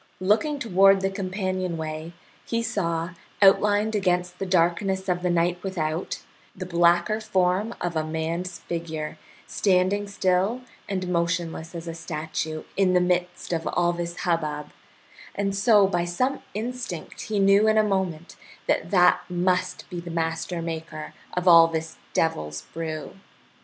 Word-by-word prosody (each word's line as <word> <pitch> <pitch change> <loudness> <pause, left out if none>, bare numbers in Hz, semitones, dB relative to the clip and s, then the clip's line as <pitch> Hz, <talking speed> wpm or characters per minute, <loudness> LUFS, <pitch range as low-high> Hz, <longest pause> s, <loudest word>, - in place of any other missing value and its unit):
Looking 215 +11 +2
toward 195 -5 +4
the 195 0 0
companionway, 185 -5 -3 0.3
he 230 0 -1
saw, 170 -7 -1 0.3
outlined 205 +2 +4
against 180 -3 0
the 195 - -3
darkness 190 +2 +1
of 180 -1 0
the 180 - 0
night 175 +1 +1
without, 165 -3 -3 0.3
the 185 - -5
blacker 175 +4 +3
form 190 +2 +1
of 175 -1 -3
a 155 - +1
man's 165 +3 -3
figure, 160 -2 -5 0.3
standing 195 +1 +1
still 195 +4 +1 0.3
and 185 -2 -2
motionless 170 -1 -1
as 170 0 -6
a 165 - -4
statue 155 -1 -4
in 190 -2 +3
the - - +6
midst 180 0 -1
of 165 -1 -2
all 175 0 +2
this 170 0 -4
hubbub, 150 -4 -1 0.6
and 195 -1 -1
so 205 0 +5
by 175 -3 0
some 255 +11 -1
instinct 235 -5 -5
he 215 - 0
knew 200 +2 +5
in 215 0 +4
a 215 - +5
moment 190 -5 -2 0.3
that - - 0
that 180 -2 +5
must 180 +1 0
be 175 - -4
the 170 0 -8
master 165 +1 -2
maker 160 -2 -6 0.2
of 180 +1 0
all 165 -1 +9
this 160 -1 -4 0.2
devil's 75 - -1
brew. 160 -2 -5
180 Hz, 145 wpm, -25 LUFS, 165-195 Hz, 0.6 s, all